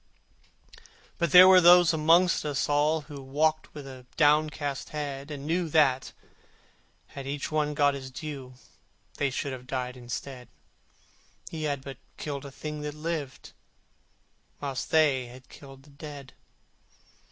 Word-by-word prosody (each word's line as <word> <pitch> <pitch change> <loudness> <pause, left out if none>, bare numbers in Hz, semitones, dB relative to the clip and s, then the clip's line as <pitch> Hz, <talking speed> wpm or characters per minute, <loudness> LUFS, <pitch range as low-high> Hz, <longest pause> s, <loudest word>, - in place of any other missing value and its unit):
But 170 -3 0
there 180 +3 +10
were 185 -1 +8
those 175 0 +7
amongst 165 +3 +3
us 145 -1 -1
all 150 +2 +2
Who 145 -2 -10
walked 155 +4 0
with 135 -3 -10
downcast 150 -2 +1
head, 140 -1 -5
And 145 -2 -7
knew 170 +2 -1
that, 140 -4 +2 1.0
had 135 -1 -8
each 145 +2 -4
got 150 -2 +1
his 135 -1 -7
due, 130 -1 -8 0.6
They 145 - +1
should 140 +1 -3
have 125 -1 -9
died 125 -1 -3
instead: 125 +1 -7 1.0
He 155 -2 -4
had 140 -3 -2
but 135 -2 -8 0.2
killed 145 -2 -5
a 140 - -9
thing 150 +2 -6
that 150 0 -5
lived, 150 -4 -5 1.1
Whilst 140 -3 -4
they 140 -6 +3
had 130 +2 -14
killed 135 -1 -14
the 145 - -19
dead. 140 -2 -10
145 Hz, 135 wpm, -27 LUFS, 135-155 Hz, 1.1 s, there